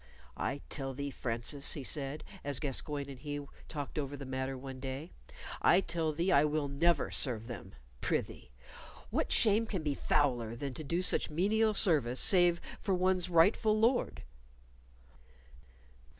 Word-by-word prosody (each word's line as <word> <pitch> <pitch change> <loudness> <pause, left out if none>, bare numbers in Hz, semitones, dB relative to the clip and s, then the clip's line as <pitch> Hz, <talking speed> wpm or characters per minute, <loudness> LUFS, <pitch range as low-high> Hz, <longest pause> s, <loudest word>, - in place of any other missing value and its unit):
"I 140 +2 -3
tell 135 -3 -4
thee, 140 +1 -4
Francis," 120 +4 -2
he 145 - -3
said, 145 +2 -2 0.2
as 145 -3 0
Gascoyne 145 0 -3
and 135 -2 -9
he 145 +1 -5 0.2
talked 145 -1 -5
over 145 0 -4
the 140 - -7
matter 130 0 -3
one 130 0 -8
day 135 +5 -5 0.5
"I 175 - +6
tell 165 -4 -1
thee 170 +5 0
I 140 - +6
will 150 -1 0
never 155 +3 +1
serve 115 -4 0
them. 115 -6 -8 0.3
Prithee, 65 - -2 0.6
what - - -1
shame 220 +1 +4
can 185 -7 -3
be 150 -2 0
fouler 120 -6 +1
than 135 +2 -5
to 155 - -6
do 170 +5 -1
such - - +3
menial 210 +7 +2
service, 145 - +3
saving 175 -2 +4 0.2
for 195 -3 +1
one's 185 0 +2
rightful 205 +6 +4
Lord?" 240 +3 +1
145 Hz, 150 wpm, -32 LUFS, 135-175 Hz, 0.6 s, I